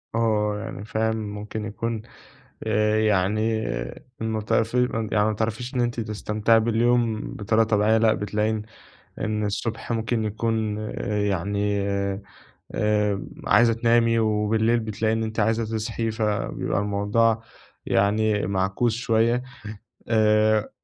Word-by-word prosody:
آه، 105 Hz, -2 st, +1 dB
يعني 100 Hz, -, -7 dB
فاهم، 110 Hz, +1 st, 0 dB
ممكن 105 Hz, 0 st, -5 dB
يكون 110 Hz, +2 st, -3 dB, 0.7 s
آآ، 105 Hz, +1 st, +2 dB
يعني 110 Hz, +2 st, +1 dB, 0.6 s
م 110 Hz, -1 st, -1 dB
ت 105 Hz, -, -5 dB
في 115 Hz, -1 st, +1 dB
يعني 105 Hz, 0 st, +3 dB
ما -, -, +1 dB
تعرفيش 115 Hz, +4 st, -3 dB
إن 125 Hz, -, +1 dB
أنتِ 120 Hz, 0 st, 0 dB
تستمتعي 110 Hz, +1 st, +1 dB
باليوم 115 Hz, 0 st, +2 dB
بطريقة 110 Hz, +2 st, +2 dB
طبيعية، 110 Hz, 0 st, +3 dB
لأ، 110 Hz, -1 st, +4 dB
بتلاقي 105 Hz, +1 st, -1 dB
إن 110 Hz, -1 st, -2 dB, 0.6 s
إن 105 Hz, 0 st, -1 dB
الصبح 110 Hz, +3 st, -3 dB
ممكن 115 Hz, 0 st, -1 dB
يكون 110 Hz, 0 st, -1 dB, 0.5 s
يعني 100 Hz, +2 st, 0 dB, 1.0 s
آآ، 105 Hz, -2 st, +1 dB, 0.2 s
عايزة 120 Hz, -1 st, +5 dB
تنامي، 115 Hz, 0 st, +3 dB
وبالليل 110 Hz, +2 st, +2 dB
بتلاقي 110 Hz, 0 st, -1 dB
إن 110 Hz, 0 st, 0 dB
أنتِ 110 Hz, 0 st, -3 dB
عايزة 110 Hz, +2 st, +1 dB
تصحي، 110 Hz, +1 st, -2 dB
فبيبقى 105 Hz, -, -1 dB
الموضوع 105 Hz, +3 st, +1 dB, 0.4 s
يعني 105 Hz, +1 st, +2 dB
معكوس 95 Hz, +4 st, 0 dB
شوية. 120 Hz, 0 st, +1 dB, 0.6 s
آآ 110 Hz, -1 st, +3 dB
110 Hz, 120 wpm, -24 LUFS, 105-115 Hz, 1.0 s, عايزة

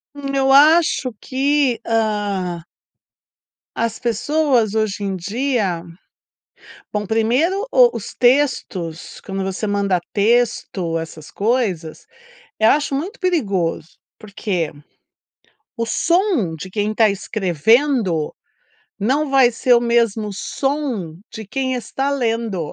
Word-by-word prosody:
Hum 275 Hz, -1 st, -5 dB
eu 270 Hz, 0 st, +2 dB
acho 295 Hz, -3 st, +5 dB
que, 275 Hz, -1 st, +1 dB
hã 205 Hz, -6 st, -1 dB, 1.2 s
as 230 Hz, -1 st, -1 dB
pessoas 240 Hz, -1 st, +1 dB
hoje 215 Hz, -2 st, -1 dB
em 195 Hz, -1 st, -2 dB
dia. 200 Hz, -3 st, -1 dB, 1.1 s
Bom 210 Hz, -1 st, -2 dB
primeiro, 260 Hz, -, +1 dB
o -, -, +5 dB
os -, -, -7 dB
textos, 245 Hz, -, 0 dB
quando 195 Hz, -1 st, -4 dB
você 190 Hz, +3 st, -3 dB
manda 200 Hz, -2 st, +1 dB
texto, 205 Hz, -6 st, +1 dB
essas 160 Hz, -1 st, -8 dB
coisas, 200 Hz, -8 st, -1 dB, 0.6 s
eh, 220 Hz, -, +5 dB
acho 290 Hz, +2 st, +2 dB
muito 370 Hz, -, -4 dB
perigoso. 200 Hz, -, -1 dB, 0.3 s
Porque 195 Hz, -6 st, -3 dB, 1.1 s
o 230 Hz, 0 st, -2 dB
som 335 Hz, -, +1 dB
de 185 Hz, -, -7 dB
quem 210 Hz, +1 st, -1 dB
está 215 Hz, 0 st, +3 dB
escrevendo, 200 Hz, -, +1 dB, 0.7 s
não 275 Hz, +7 st, +1 dB
vai 265 Hz, -3 st, +5 dB
ser 245 Hz, +2 st, +1 dB
o 235 Hz, -, +6 dB
mesmo 230 Hz, -3 st, +1 dB
som 265 Hz, -, -3 dB, 0.2 s
de 220 Hz, -3 st, -8 dB
quem 260 Hz, +3 st, -2 dB
está 270 Hz, +4 st, -2 dB
lendo. 225 Hz, -, -2 dB
225 Hz, 110 wpm, -20 LUFS, 195-270 Hz, 1.2 s, o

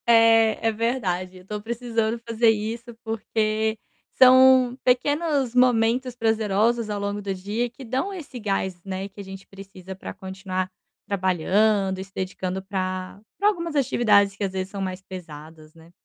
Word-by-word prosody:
É, 225 Hz, -1 st, +5 dB
é -, -, +3 dB
verdade. 200 Hz, -6 st, -2 dB
Eu 180 Hz, -, -14 dB
estou 210 Hz, +2 st, -6 dB
precisando 230 Hz, 0 st, -2 dB
fazer 230 Hz, 0 st, +3 dB
isso, 225 Hz, +2 st, -2 dB
porque 220 Hz, 0 st, -1 dB, 0.4 s
são 255 Hz, -1 st, +6 dB
pequenos 280 Hz, +1 st, +1 dB
momentos 250 Hz, 0 st, +3 dB
prazerosos 225 Hz, 0 st, +1 dB
ao 205 Hz, -1 st, -2 dB
longo 200 Hz, +1 st, -3 dB
do 195 Hz, -1 st, -3 dB
dia 205 Hz, +6 st, -2 dB
que 255 Hz, +3 st, -12 dB
dão 265 Hz, -, -2 dB
esse 300 Hz, -9 st, -8 dB
gás, 190 Hz, -4 st, -2 dB
né, 195 Hz, 0 st, -4 dB
que 200 Hz, -, -16 dB
a -, -, -5 dB
gente 195 Hz, 0 st, -10 dB
precisa 190 Hz, -1 st, -11 dB
para 190 Hz, -, -8 dB
continuar 190 Hz, -1 st, -4 dB, 0.4 s
trabalhando, 190 Hz, +1 st, +1 dB
se 195 Hz, 0 st, -18 dB
dedicando 185 Hz, 0 st, -3 dB
pra 185 Hz, -1 st, -4 dB, 0.2 s
pra 405 Hz, -, +2 dB
algumas 335 Hz, -6 st, -3 dB
atividades 210 Hz, -7 st, +3 dB
que, 205 Hz, -, -5 dB
às 195 Hz, -, -1 dB
vezes, 190 Hz, 0 st, -3 dB
são 200 Hz, -, -7 dB
mais 185 Hz, -1 st, -4 dB
pesadas, 160 Hz, -4 st, -11 dB
né. 165 Hz, 0 st, -18 dB
210 Hz, 155 wpm, -24 LUFS, 190-235 Hz, 0.4 s, são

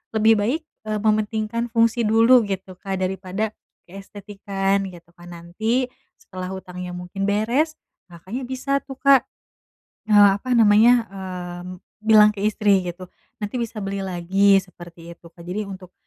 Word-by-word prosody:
lebih 220 Hz, +1 st, +5 dB
baik, 255 Hz, +11 st, -1 dB, 0.2 s
eee, 215 Hz, -1 st, -1 dB
mementingkan 215 Hz, +2 st, -1 dB
fungsi 230 Hz, 0 st, +2 dB
dulu 230 Hz, +3 st, +5 dB
gitu, 190 Hz, -1 st, -5 dB
Kak, 195 Hz, -1 st, -4 dB
daripada, 190 Hz, +3 st, -3 dB, 0.4 s
keestetikan 195 Hz, 0 st, -3 dB
gitu 170 Hz, -1 st, -16 dB
kan. 175 Hz, 0 st, -13 dB
Nanti, 220 Hz, +9 st, -2 dB, 0.3 s
setelah 185 Hz, -1 st, -8 dB
hutangnya 180 Hz, -1 st, -7 dB
mungkin 180 Hz, +2 st, -6 dB
beres, 235 Hz, +10 st, 0 dB, 0.4 s
Kakaknya 190 Hz, +10 st, -7 dB
bisa 270 Hz, +2 st, -1 dB
tuh, 270 Hz, -, -7 dB
Kak, 275 Hz, 0 st, +4 dB, 0.8 s
eee, 205 Hz, -1 st, +7 dB
apa 255 Hz, +1 st, 0 dB
namanya, 230 Hz, +2 st, +5 dB, 0.6 s
mmm, 180 Hz, 0 st, -10 dB, 0.2 s
bilang 215 Hz, -1 st, +6 dB
ke 205 Hz, -, -9 dB
istri 205 Hz, -1 st, +2 dB
gitu, 180 Hz, 0 st, -8 dB, 0.3 s
"Nanti 235 Hz, +4 st, -4 dB
bisa 230 Hz, -1 st, -5 dB
beli 195 Hz, 0 st, -3 dB
lagi," 190 Hz, +2 st, +2 dB
seperti 175 Hz, -3 st, -7 dB
itu, 170 Hz, -, -16 dB
Kak. 170 Hz, 0 st, -16 dB
Jadi 195 Hz, +4 st, -4 dB
untuk, 185 Hz, -2 st, -10 dB
205 Hz, 140 wpm, -22 LUFS, 185-225 Hz, 0.8 s, eee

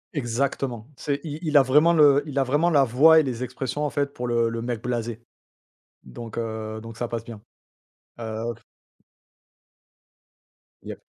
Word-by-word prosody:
Exactement, 125 Hz, -2 st, -2 dB
c'est 140 Hz, +1 st, -3 dB
il 155 Hz, -1 st, -6 dB
il 155 Hz, -3 st, +3 dB
a 140 Hz, -, +7 dB
vraiment 150 Hz, +6 st, +4 dB
le 145 Hz, -4 st, +5 dB
il 140 Hz, -2 st, -6 dB
a 135 Hz, -, +4 dB
vraiment 145 Hz, +6 st, +1 dB
la 145 Hz, -5 st, +4 dB
voix 145 Hz, +6 st, +6 dB
et 155 Hz, -, +3 dB
les 125 Hz, -2 st, -3 dB
expressions, 130 Hz, +3 st, -4 dB
en 150 Hz, -, 0 dB
fait, 140 Hz, 0 st, -2 dB
pour 125 Hz, -2 st, -4 dB
le 120 Hz, -1 st, +1 dB
le 115 Hz, 0 st, -4 dB
mec 120 Hz, -1 st, -3 dB
blasé. 120 Hz, -2 st, -3 dB, 0.8 s
Donc 115 Hz, -, -9 dB
heu, 110 Hz, -1 st, -4 dB
donc 115 Hz, 0 st, -10 dB
ça 120 Hz, +1 st, -3 dB
passe 115 Hz, -1 st, -4 dB
bien. 115 Hz, -3 st, -10 dB, 0.8 s
Heu 115 Hz, +1 st, -4 dB, 2.3 s
Yep. -, -, -9 dB
125 Hz, 160 wpm, -24 LUFS, 115-145 Hz, 2.3 s, a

